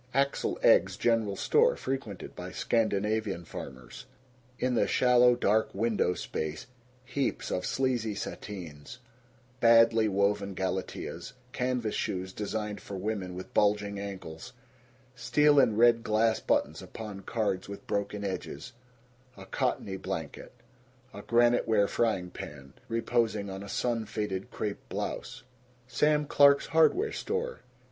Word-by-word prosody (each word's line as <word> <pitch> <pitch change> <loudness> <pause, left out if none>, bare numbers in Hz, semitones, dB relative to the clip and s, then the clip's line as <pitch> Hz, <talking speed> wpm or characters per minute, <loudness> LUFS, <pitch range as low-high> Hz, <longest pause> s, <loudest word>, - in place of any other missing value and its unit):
Axel 140 0 +1
Egge's - - +5
General 115 -4 +1
Store, 485 - +3
frequented 130 - -5
by - - -7
Scandinavian 105 -4 0
farmers. 65 -5 -9 0.5
In 125 0 0
the 105 -4 +2
shallow 125 +1 +5
dark 110 -2 +1
window 105 -4 +1
space 80 0 -4 0.4
heaps 130 +1 -2
of 90 - -1
sleazy 120 -5 0
sateens, 85 -8 -7 0.6
badly 115 -1 +6
woven 100 0 0
galateas, 95 +5 -4 0.2
canvas 125 -4 -1
shoes 95 0 -3
designed 105 0 -4
for 100 - -7
women 95 -2 -3
with 95 - -8
bulging 100 -1 +2
ankles, 100 +1 -7 0.6
steel 140 +5 +4
and 110 -5 +3
red 115 0 +5
glass 110 +1 +2
buttons - - 0
upon 105 -3 -8
cards 100 -3 -2
with 100 - -8
broken 100 0 -2
edges, 100 +5 -5 0.6
a - - -10
cottony 95 -1 -2
blanket, 85 -5 -6 0.6
a - - -8
granite 120 +1 +3
ware 105 -3 +3
frying 95 -7 0
pan 70 -2 -9
reposing 115 -3 0
on 95 0 -6
a 100 - -8
sun 115 -3 -1
faded 105 -3 -3
crepe 105 -1 -4
blouse. - - -5 0.4
Sam 150 +3 +2
Clark's 140 0 +5
Hardware 350 - +3
Store. 480 +2 -3
110 Hz, 125 wpm, -29 LUFS, 100-120 Hz, 0.6 s, badly